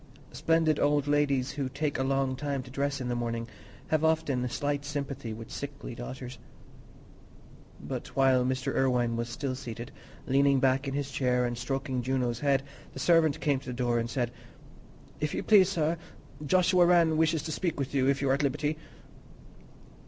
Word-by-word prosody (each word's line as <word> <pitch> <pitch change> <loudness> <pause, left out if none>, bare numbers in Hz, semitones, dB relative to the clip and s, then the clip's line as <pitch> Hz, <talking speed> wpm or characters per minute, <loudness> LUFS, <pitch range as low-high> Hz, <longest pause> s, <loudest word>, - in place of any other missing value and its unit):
Splendid 165 -2 +2
old 145 -1 +2
ladies, 140 -3 +1
who 135 -3 -3
take 145 +1 -2
a - - +1
long 135 -1 0
time 140 -1 -3
to 125 - -12
dress 140 +1 -1
in 125 - -3
the 120 - -1
morning, 115 -1 -3 0.4
have 155 0 +1
often 140 -6 +1
slight 145 +2 -2
sympathy 140 -5 -4
with 110 0 -8
sickly 140 -3 -6
daughters. 125 +1 -7 1.4
But - - -5
while 130 -2 +4
Mr. 130 +1 -1
Irwine 125 -3 +2
was 120 0 -3
still 130 +2 -3
seated, 120 -1 -7 0.3
leaning 140 0 +3
back 135 +1 +2
in 135 - -2
his 140 -1 -2
chair 125 -2 +1
and 120 0 -2
stroking 130 +1 -2
Juno's 125 -2 -1
head, 140 -1 +2 0.3
the - - -10
servant 165 -4 +3
came 140 -3 +1
to 135 - -15
the 125 - -3
door 120 -1 0
and 115 0 -2
said, 120 0 -1 0.9
"If 150 -1 -2
you - - -2
please, 195 -4 +6
sir, 165 -3 0 0.4
Joshua 180 +2 +4
Rann 170 -2 +4
wishes 160 0 +2
to 160 - -4
speak 170 -1 -2
with 140 0 -3
you, 135 -1 +3
if 140 0 +1
you 135 - +2
are - - +5
at 140 - +1
liberty." 145 +2 -1
135 Hz, 180 wpm, -29 LUFS, 125-145 Hz, 1.4 s, please